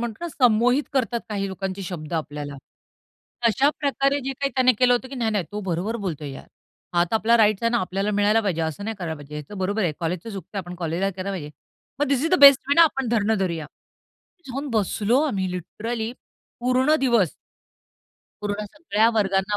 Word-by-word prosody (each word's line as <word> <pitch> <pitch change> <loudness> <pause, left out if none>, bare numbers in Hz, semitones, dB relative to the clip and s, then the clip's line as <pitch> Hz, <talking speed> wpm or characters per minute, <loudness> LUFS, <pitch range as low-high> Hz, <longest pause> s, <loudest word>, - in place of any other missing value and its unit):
म्हणतो 235 +7 -4
ना - - -2
संमोहित 245 0 +3
करतात 240 -3 0
काही 200 -2 -2
लोकांचे 190 +1 -4
शब्द 170 -3 -6
आपल्याला. 150 -3 -4 0.9
अशा 270 +6 +3
प्रकारे 280 0 +1
जे 270 - -2
काही 275 +1 -2
त्याने 255 -1 +5
केलं 250 -1 +5
होतं 250 +2 -2
की 275 - -8
"नाही, 230 -3 0
नाही. 205 -4 0
तो 210 - -3
बरोबर 190 +4 -2
बोलतोय 150 -6 -4
यार. 135 - -10 0.5
हा 175 0 +4
तर - - -1
आपला 225 +1 +4
राइट्स 215 -2 +3
आहे 230 - +2
ना. 240 - +2
आपल्याला 195 +2 -1
मिळायला 205 +2 +3
पाहिजे. 185 -6 -1
असं 160 +5 -3
नाही 225 0 -4
करायला 165 -3 -3
पाहिजे. 145 +1 -11
ह्याच 150 +7 -7
बरोबर 200 +3 0
आहे. 170 -4 +1
कॉलेजचं 175 +6 -3
चुकतंय. 200 0 -7
आपण 180 -1 -6
कॉलेजला 175 +3 -1
केला 190 +1 -5
पाहिजे." 155 -6 -5 0.5
मग 290 - +3
this 280 +1 +1
is 330 - 0
the - - +5
best 280 -2 +10
way 285 - +4
ना 335 - +8
आपण 270 -6 +1
धरणं 220 -2 +1
धरूया. 170 -5 -2 0.8
जाऊन 275 +3 -4
बसलो 220 +3 +1
आम्ही 195 -11 -1
लिटरली 220 +6 -4 0.5
पूर्ण 255 +5 +3
दिवस. 235 - +3 1.1
पूर्ण 205 0 -2
सगळ्या 230 -8 +2
वर्गांना 195 -1 +1
210 Hz, 195 wpm, -24 LUFS, 185-245 Hz, 1.1 s, best